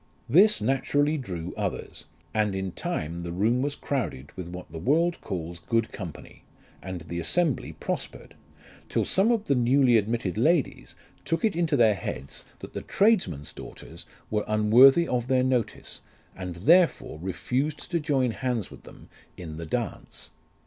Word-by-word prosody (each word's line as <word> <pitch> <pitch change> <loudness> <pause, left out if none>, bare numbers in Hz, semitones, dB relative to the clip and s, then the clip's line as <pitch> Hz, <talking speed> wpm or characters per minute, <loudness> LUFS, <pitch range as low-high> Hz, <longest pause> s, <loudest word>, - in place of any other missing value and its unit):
This 190 - +5
naturally 145 +5 +1
drew 90 - -5
others, - - -4 0.3
and 105 -2 +1
in 95 -1 -3
time 80 0 -4
the 85 0 -5
room 110 +8 +1
was 140 +1 -1
crowded 115 - -3
with 90 -2 -6
what 90 -1 -9
the 80 - -6
world 165 - +1
calls 85 -2 -5
good 115 +5 0
company; 90 -7 -9 0.4
and 95 -1 -6
the 85 +2 -5
assembly 160 - 0
prospered, - - -5 0.6
till - - 0
some 200 +5 +3
of 225 -3 0
the - - +2
newly 125 0 +4
admitted 110 -2 -1
ladies 155 +4 +1 0.3
took 165 +5 0
it 215 - +1
into 165 -4 +1
their 110 -3 +5
heads 70 -7 -6 0.2
that - - -9
the - - -4
tradesmen's 180 - +1
daughters - - -11 0.2
were 105 -1 +1
unworthy 120 +10 +6
of 125 -1 -1
their 130 -1 +3
notice, 125 -4 -2 0.3
and 90 -2 -6
therefore 160 - +3
refused 125 - -2
to 170 - +1
join 135 -5 +1
hands 120 -3 -2
with - - -12
them - - -14 0.3
in 80 -4 -7
the 85 0 -6
dance. - - -5
115 Hz, 155 wpm, -26 LUFS, 90-145 Hz, 0.6 s, unworthy